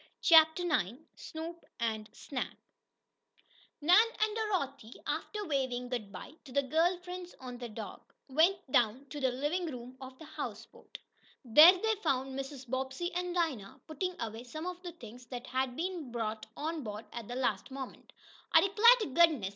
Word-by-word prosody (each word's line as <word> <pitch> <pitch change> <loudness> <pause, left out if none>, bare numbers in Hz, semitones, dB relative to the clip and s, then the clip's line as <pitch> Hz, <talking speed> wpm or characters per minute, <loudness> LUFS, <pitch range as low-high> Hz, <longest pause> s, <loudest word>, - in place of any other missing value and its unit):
CHAPTER 320 +1 +7
IX 250 - 0 0.2
SNOOP 330 +1 -7 0.2
AND 220 -2 -2
SNAP 265 -3 -5 1.2
Nan 355 +8 +7 0.2
and 430 0 +1
Dorothy, 280 - -2
after 420 -1 -3
waving 260 -5 -1
good 225 -5 -4
bye 280 - -9
to 265 - -13
the 280 +2 +2
girl 325 +7 +2
friends 360 0 -7
on 250 -2 -8
the 240 -1 -6
dock, 215 - -9
went 320 +8 +4
down 245 +3 +2
to 290 - -6
the 260 -2 +2
living 295 +8 -1
room 250 0 -9
of 260 0 -9
the 320 - -11
houseboat. 245 -8 -8 0.5
There 300 +10 +10
they 445 +4 +1
found 265 -6 0
Mrs. 270 -1 -6
Bobbsey 265 +8 -3
and 360 0 -2
Dinah 280 - -1
putting 360 +3 -4
away 225 +1 -5
some 310 +7 -7
of 360 0 -5
the 350 -2 -7
things 245 -4 -12
that 245 0 -6
had 260 0 -1
been 335 -5 -4
brought 220 -2 -3
on 315 +1 -3
board 210 -3 -6
at 235 -3 -6
the 245 - -5
last 240 -5 -1
moment. 265 -1 -8 0.4
"I - - +7
'clar 420 +4 +3
t' 280 - -3
goodness!" 305 - +4
270 Hz, 170 wpm, -32 LUFS, 245-340 Hz, 1.2 s, There